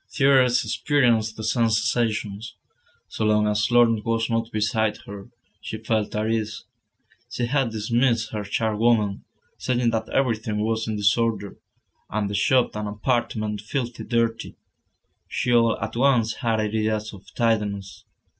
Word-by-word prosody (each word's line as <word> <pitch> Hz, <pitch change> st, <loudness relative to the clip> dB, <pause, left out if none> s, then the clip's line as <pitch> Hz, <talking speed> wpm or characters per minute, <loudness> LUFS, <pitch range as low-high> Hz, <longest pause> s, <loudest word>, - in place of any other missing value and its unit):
Thérèse 130 Hz, -5 st, +3 dB
experienced 115 Hz, -2 st, +1 dB
the 110 Hz, -, -6 dB
same 115 Hz, +1 st, +2 dB
sensations. 110 Hz, -1 st, -1 dB, 0.5 s
So -, -, -4 dB
long 105 Hz, 0 st, +3 dB
as 105 Hz, 0 st, +1 dB
Laurent 115 Hz, -3 st, +4 dB
was 115 Hz, 0 st, -1 dB
not 115 Hz, 0 st, -1 dB
beside 110 Hz, 0 st, 0 dB
her, 100 Hz, +2 st, -9 dB, 0.3 s
she 110 Hz, -, -5 dB
felt 110 Hz, -1 st, -1 dB
at 105 Hz, +1 st, 0 dB
ease. 110 Hz, -1 st, -3 dB, 0.6 s
She 120 Hz, -, -2 dB
had 135 Hz, 0 st, +1 dB
dismissed 115 Hz, +1 st, 0 dB
her 105 Hz, -1 st, -3 dB
charwoman, 110 Hz, 0 st, +1 dB, 0.4 s
saying 120 Hz, -2 st, +1 dB
that 110 Hz, -1 st, -2 dB
everything 110 Hz, -5 st, 0 dB
was 110 Hz, 0 st, -1 dB
in 110 Hz, -, -2 dB
disorder, 105 Hz, 0 st, 0 dB, 0.5 s
and 105 Hz, -1 st, -2 dB
the -, -, -4 dB
shop 125 Hz, +4 st, +2 dB
and 105 Hz, 0 st, -3 dB
apartment 105 Hz, -1 st, -2 dB
filthy 120 Hz, +2 st, -4 dB
dirty. 115 Hz, -1 st, -1 dB, 0.7 s
She 125 Hz, -, -1 dB
all 115 Hz, -1 st, +4 dB
at -, -, -5 dB
once 120 Hz, -3 st, +3 dB
had 115 Hz, -3 st, 0 dB
ideas 110 Hz, 0 st, -1 dB
of 100 Hz, -1 st, -14 dB
tidiness. 105 Hz, -4 st, -1 dB
110 Hz, 140 wpm, -24 LUFS, 105-120 Hz, 0.7 s, Laurent